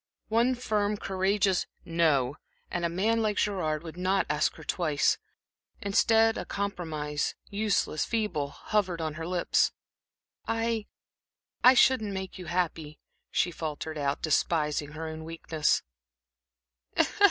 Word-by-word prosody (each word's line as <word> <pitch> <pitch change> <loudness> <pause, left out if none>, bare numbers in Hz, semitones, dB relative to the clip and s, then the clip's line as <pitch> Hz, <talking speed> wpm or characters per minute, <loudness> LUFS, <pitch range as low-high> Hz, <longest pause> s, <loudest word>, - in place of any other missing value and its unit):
One 235 +3 +3
firm, 210 -4 0
courageous 190 0 +1 0.2
"No," 155 -6 +2 0.3
and 175 - -2
a 170 - +2
man 215 +7 +1
like 210 -2 0
Gerard 165 -7 0
would 165 0 -8
not 185 +2 +1
ask 150 0 +1
her - - -11
twice. 155 -5 +1 0.6
Instead, 225 +3 +3
a - - -3
compromise, 160 -7 -2 0.2
useless, 200 -6 +1
feeble, 210 -11 -1
hovered 185 +3 -1
on 160 -2 -2
her 165 +1 -5
lips. 180 -1 +2 0.8
"I 225 -1 0 0.9
shouldn't 220 -6 +4
make 190 0 -5
you 180 - -8
happy," 165 -3 -2 0.3
she 175 - +1
faltered 155 -1 -4
out, 140 0 -1
despising 150 -2 +1
her 160 +1 -5
own 160 0 -6
weakness. 160 -1 0
175 Hz, 120 wpm, -29 LUFS, 155-205 Hz, 0.9 s, shouldn't